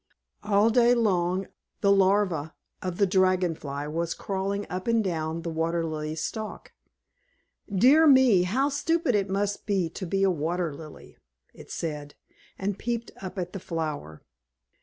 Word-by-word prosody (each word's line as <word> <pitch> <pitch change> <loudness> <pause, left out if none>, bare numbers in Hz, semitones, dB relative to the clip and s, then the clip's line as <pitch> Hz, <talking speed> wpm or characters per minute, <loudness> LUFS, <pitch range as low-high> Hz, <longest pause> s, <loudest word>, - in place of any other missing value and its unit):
All 210 +2 +3
day 240 +1 +5
long 190 -4 +1 0.4
the 200 - +4
Larva 190 -5 +2 0.3
of 180 -2 -4
the 200 - +4
Dragon 185 -2 +2
Fly 145 -2 -6
was 165 +2 -2
crawling 200 +1 -3
up 185 +3 -5
and 230 -1 +3
down 165 -3 -2
the 170 - -3
Water 165 +1 -1
Lily's 155 0 -4
stalk. 215 -1 -6 1.0
"Dear 265 +11 +6
me, 260 -9 +6
how 250 +11 +1
stupid 300 0 0
it 200 -2 +1
must 200 +2 -2
be 190 -5 0
to 185 +2 -6
be 195 +3 0
a 195 - +4
Water 170 0 -2
Lily!" 155 +1 -12 0.4
it - - -14
said, 150 -3 -5 0.4
and 195 0 -3
peeped 235 0 -3
up 190 0 -7
at 180 -1 -4
the 195 - -5
flower. 155 - -5
185 Hz, 155 wpm, -27 LUFS, 165-205 Hz, 1.0 s, Dear